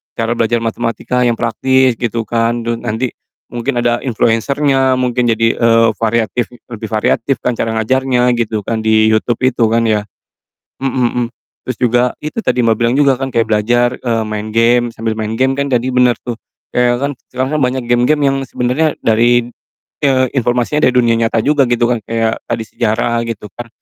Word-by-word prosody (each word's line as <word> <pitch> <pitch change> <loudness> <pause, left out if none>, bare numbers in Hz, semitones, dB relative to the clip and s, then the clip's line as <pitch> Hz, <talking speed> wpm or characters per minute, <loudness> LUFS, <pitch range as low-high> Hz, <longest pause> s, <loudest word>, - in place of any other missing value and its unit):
cara 115 +1 -1
belajar 115 0 +1
matematika 120 +2 -1
yang 120 -1 +2
praktis 130 +2 +2
gitu 115 -1 -2
kan 115 +1 0
terus 115 0 -1
nanti, 120 +2 -2 0.4
mungkin 120 +1 -2
ada 120 0 +1
influencer-nya 130 +3 +1
mungkin 125 -1 0
jadi, 115 0 +2
eee, 115 -1 +4
variatif 115 +1 0 0.2
lebih 110 -1 -6
variatif 115 +4 +1
kan 125 - +1
cara 115 0 -2
ngajarnya 125 +1 +1
gitu 110 -2 -1
kan 115 +1 -2
di 110 0 +3
YouTube 110 +2 0
itu 125 -3 +2
kan 115 0 +2
ya. 105 -1 +1 0.8
Mhm - - +2 0.4
mhm, - - -3 0.4
terus 125 -3 -4
juga 120 0 +3 0.2
itu 155 +9 -4
tadi 125 - +1
Mbak, 115 -1 +3
bilang 120 +1 +2
juga 140 -2 +4
kan 135 - -2
kayak 115 -1 +1
belajar, 120 +3 +2
eee, 115 -3 -1
main 105 0 -4
game 120 +1 +3
sambil 115 0 -3
main 110 0 -3
game 130 +2 +2
kan 140 0 -1
tadi 125 +1 +1
bener 125 -1 +4
tuh. 120 -2 -5 0.4
Iya 120 0 +3
kan, 140 +1 -1 0.2
sekarang 130 +4 -1
kan - - -1
banyak 125 0 -1
game-game 125 +5 +2
yang 135 - 0
sebenernya 130 +5 0
dari, 120 +2 +3 0.6
eee, 130 -2 +3
informasinya 125 +4 +1
dari - - +1
dunia 120 -2 +3
nyata 115 0 +1
juga 145 -1 +3
gitu 120 -1 +1
kan 120 -2 0
kayak 115 -1 -1
tadi 115 - -2
sejarah 115 +1 -1
gitu 110 -2 -6
kan, 120 -1 -7
120 Hz, 180 wpm, -15 LUFS, 115-125 Hz, 0.8 s, eee